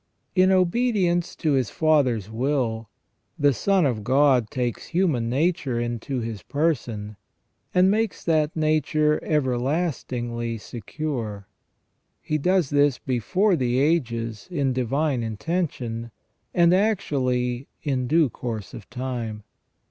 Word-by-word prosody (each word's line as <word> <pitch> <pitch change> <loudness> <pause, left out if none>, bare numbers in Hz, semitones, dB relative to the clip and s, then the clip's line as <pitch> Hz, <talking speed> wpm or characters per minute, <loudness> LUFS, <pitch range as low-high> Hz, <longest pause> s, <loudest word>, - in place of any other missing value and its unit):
In 185 0 +4
obedience 185 -2 +2
to 155 - 0
His 130 -5 +1
Father's 135 -10 +2
will, 115 -2 -1 0.5
the 145 -1 +4
Son 195 - +2
of 115 -6 -1
God 130 -1 +3
takes 125 -5 -3
human 160 -10 +1
nature 140 -2 0
into 120 +2 -3
His 115 -3 -5
person, 120 -9 -2 0.5
and 185 +1 +4
makes 220 0 -1
that 155 -2 +1
nature 155 -1 +1
everlastingly 125 -4 -1
secure. 115 -2 -5 0.7
He 155 - -2
does 180 -1 +2
this 145 -2 +3
before 180 - +1
the 125 -4 0
ages 115 -7 0
in 140 -7 0
divine 130 +2 0
intention, 115 - -3 0.4
and 170 0 +4
actually 135 - 0 0.2
in 130 -4 -1
due 160 +2 +4
course 110 -5 -5
of 105 - -10
time. 120 -4 -4
135 Hz, 115 wpm, -24 LUFS, 120-160 Hz, 0.7 s, In